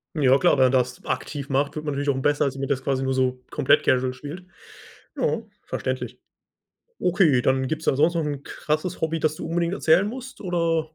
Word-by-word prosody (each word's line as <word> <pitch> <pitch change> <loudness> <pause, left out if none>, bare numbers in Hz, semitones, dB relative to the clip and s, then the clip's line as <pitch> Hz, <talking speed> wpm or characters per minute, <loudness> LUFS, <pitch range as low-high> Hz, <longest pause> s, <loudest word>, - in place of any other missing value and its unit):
Ja 135 -3 +4
klar, 135 - +4
wenn 130 - +5
man 130 - +3
das 125 -1 0
aktiv 140 -2 -3
macht, 140 +2 0
wird 155 0 -5
man 145 - -1
natürlich 140 +1 -1
auch 135 -1 0
besser, 145 +1 +2
als 135 -1 -2
wenn 135 - -2
das 135 -2 -1
quasi 135 -1 0
nur 130 0 0
so 130 -1 0
komplett - - +3
casual 130 0 +2
spielt. 150 +8 -8 0.7
Ja, - - 0 0.2
verständlich. - - -4 0.8
Okay, 170 -9 +3
dann 130 0 +2
gibt's 155 0 -3
da - - +2
sonst 155 +5 +3
noch 165 -2 0
'n 145 -2 -4
krasses 155 +5 -3
Hobby, 160 0 0
das 155 0 +1
du - - -6
unbedingt 170 +2 0
erzählen 175 +2 +3
musst 255 +3 -8
oder 170 -3 +1
145 Hz, 210 wpm, -24 LUFS, 130-165 Hz, 0.8 s, wenn